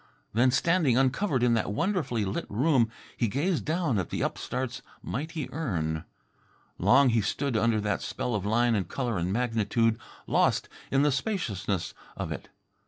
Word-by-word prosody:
Then, 120 Hz, +4 st, +4 dB
standing 145 Hz, -1 st, +3 dB
uncovered 135 Hz, +1 st, +2 dB
in 120 Hz, -1 st, +4 dB
that 115 Hz, -2 st, 0 dB
wonderfully 155 Hz, -, 0 dB
lit 95 Hz, -, -3 dB
room, 125 Hz, +1 st, +3 dB, 0.3 s
he 120 Hz, -, +1 dB
gazed 155 Hz, -, 0 dB
down 155 Hz, -, +1 dB
at 90 Hz, -, -3 dB
the -, -, -2 dB
upstart's 125 Hz, 0 st, -3 dB, 0.2 s
mighty 155 Hz, +2 st, -4 dB
urn. 85 Hz, -, -2 dB, 0.7 s
Long 135 Hz, +1 st, +5 dB
he 115 Hz, -1 st, +3 dB
stood 135 Hz, +6 st, -1 dB
under 110 Hz, 0 st, +2 dB
that 105 Hz, -1 st, -1 dB
spell 125 Hz, -, -3 dB
of 105 Hz, -3 st, -1 dB
line 115 Hz, +3 st, +2 dB
and 95 Hz, -5 st, 0 dB
colour 120 Hz, -5 st, -2 dB
and 90 Hz, +2 st, -1 dB
magnitude, 115 Hz, 0 st, +1 dB, 0.3 s
lost -, -, +2 dB, 0.2 s
in 135 Hz, +1 st, +3 dB
the 150 Hz, -, +4 dB
spaciousness 110 Hz, -, -2 dB, 0.2 s
of -, -, -3 dB
it. -, -, -6 dB
120 Hz, 160 wpm, -28 LUFS, 105-140 Hz, 0.7 s, Long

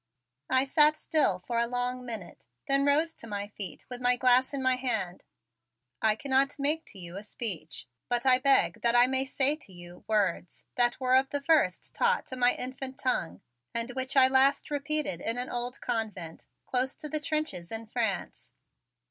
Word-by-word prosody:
I 260 Hz, 0 st, +4 dB
sat 300 Hz, +2 st, +4 dB
still 305 Hz, -, +1 dB
for 230 Hz, +6 st, -3 dB
a 235 Hz, -, +1 dB
long 250 Hz, +1 st, -2 dB
minute; 225 Hz, -7 st, -8 dB, 0.2 s
then 275 Hz, +1 st, +3 dB
I -, -, +6 dB
rose 320 Hz, +2 st, 0 dB
to 230 Hz, -, -12 dB
my 205 Hz, -1 st, -5 dB
feet 200 Hz, -3 st, -7 dB
with 250 Hz, -1 st, -5 dB
my 245 Hz, 0 st, +4 dB
glass 255 Hz, +1 st, +4 dB
in 280 Hz, -, -4 dB
my 260 Hz, -1 st, +2 dB
hand. 225 Hz, -9 st, -2 dB, 0.8 s
"I 215 Hz, -1 st, +3 dB
cannot 275 Hz, +3 st, +1 dB
make 300 Hz, +3 st, +1 dB
to -, -, -13 dB
you 175 Hz, 0 st, -8 dB
a 200 Hz, -, -7 dB
speech, 190 Hz, -, -4 dB, 0.2 s
but 240 Hz, +1 st, 0 dB
I 255 Hz, -1 st, +6 dB
beg 275 Hz, +1 st, +3 dB
that 235 Hz, 0 st, +2 dB
I 245 Hz, 0 st, +7 dB
may 265 Hz, +1 st, +1 dB
say 275 Hz, +2 st, +2 dB
to 255 Hz, -, -14 dB
you 175 Hz, 0 st, -13 dB
words 200 Hz, -5 st, -1 dB
that 240 Hz, -1 st, +2 dB
were 255 Hz, -1 st, +2 dB
of 265 Hz, +1 st, +3 dB
the 285 Hz, -, -2 dB
first 280 Hz, -, +1 dB
taught 480 Hz, 0 st, +1 dB
to 260 Hz, -, -7 dB
my 245 Hz, -1 st, +4 dB
infant 260 Hz, +1 st, -5 dB
tongue 95 Hz, -, -2 dB, 0.3 s
and 235 Hz, +1 st, -1 dB
which 260 Hz, +2 st, -2 dB
I 260 Hz, -1 st, +9 dB
last 265 Hz, +3 st, +3 dB
repeated 290 Hz, -, -2 dB
in 230 Hz, +2 st, -2 dB
an 250 Hz, +1 st, -4 dB
old 245 Hz, +1 st, -4 dB
convent 210 Hz, -9 st, -4 dB, 0.2 s
close 255 Hz, +1 st, 0 dB
to 310 Hz, -, -8 dB
the 305 Hz, +1 st, -2 dB
trenches 300 Hz, -, -3 dB
in 225 Hz, 0 st, -4 dB
France." 220 Hz, -4 st, -3 dB
250 Hz, 190 wpm, -28 LUFS, 220-275 Hz, 0.8 s, I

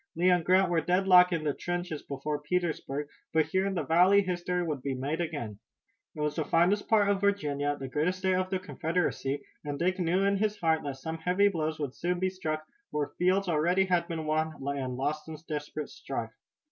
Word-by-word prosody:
Lee 180 Hz, +3 st, +4 dB
and 175 Hz, -2 st, +3 dB
Grant 185 Hz, +1 st, +4 dB
were 165 Hz, -2 st, +2 dB
deadlocked 180 Hz, +1 st, +5 dB
in 165 Hz, -3 st, -1 dB
the 150 Hz, -2 st, 0 dB
trenches 175 Hz, -2 st, -3 dB
before 145 Hz, +2 st, -4 dB
Petersburg, 150 Hz, -3 st, -2 dB, 0.3 s
but 160 Hz, -1 st, +4 dB
here 190 Hz, +5 st, 0 dB
in 195 Hz, -, -2 dB
the -, -, 0 dB
valley 185 Hz, +5 st, +5 dB
history 180 Hz, -1 st, -1 dB
would 150 Hz, -5 st, -3 dB
be 135 Hz, 0 st, -2 dB
made 145 Hz, +6 st, -2 dB
again. 145 Hz, -11 st, -4 dB, 0.6 s
It 150 Hz, -, -5 dB
was 150 Hz, 0 st, 0 dB
the 160 Hz, -, 0 dB
finest 175 Hz, +7 st, +2 dB
part 210 Hz, -2 st, +4 dB
of 200 Hz, -1 st, +1 dB
Virginia, 145 Hz, -8 st, 0 dB
the 135 Hz, -, -5 dB
greatest 155 Hz, +7 st, 0 dB
state 190 Hz, 0 st, +1 dB
of 185 Hz, 0 st, 0 dB
the 190 Hz, -, 0 dB
Confederacy, 160 Hz, -4 st, -2 dB, 0.2 s
and 145 Hz, -1 st, -4 dB
Dick 185 Hz, +4 st, 0 dB
knew 180 Hz, +2 st, +2 dB
in 200 Hz, 0 st, +2 dB
his 210 Hz, +1 st, 0 dB
heart 160 Hz, -3 st, +2 dB
that 140 Hz, -2 st, -3 dB
some 160 Hz, +4 st, -5 dB
heavy 185 Hz, +4 st, +3 dB
blows 155 Hz, -4 st, -2 dB
would 140 Hz, -4 st, -3 dB
soon 175 Hz, +4 st, -1 dB
be 185 Hz, +1 st, +1 dB
struck, 155 Hz, -4 st, -3 dB, 0.2 s
where 145 Hz, -1 st, -2 dB
fields 185 Hz, +2 st, +2 dB
already 175 Hz, +4 st, +2 dB
had 175 Hz, -2 st, +1 dB
been 160 Hz, -2 st, -4 dB
won 155 Hz, +1 st, 0 dB, 0.2 s
and 130 Hz, -2 st, -3 dB
lost 150 Hz, +4 st, -2 dB
in 160 Hz, -1 st, -6 dB
desperate 150 Hz, 0 st, -4 dB
strife. -, -, -5 dB
165 Hz, 210 wpm, -29 LUFS, 150-185 Hz, 0.6 s, deadlocked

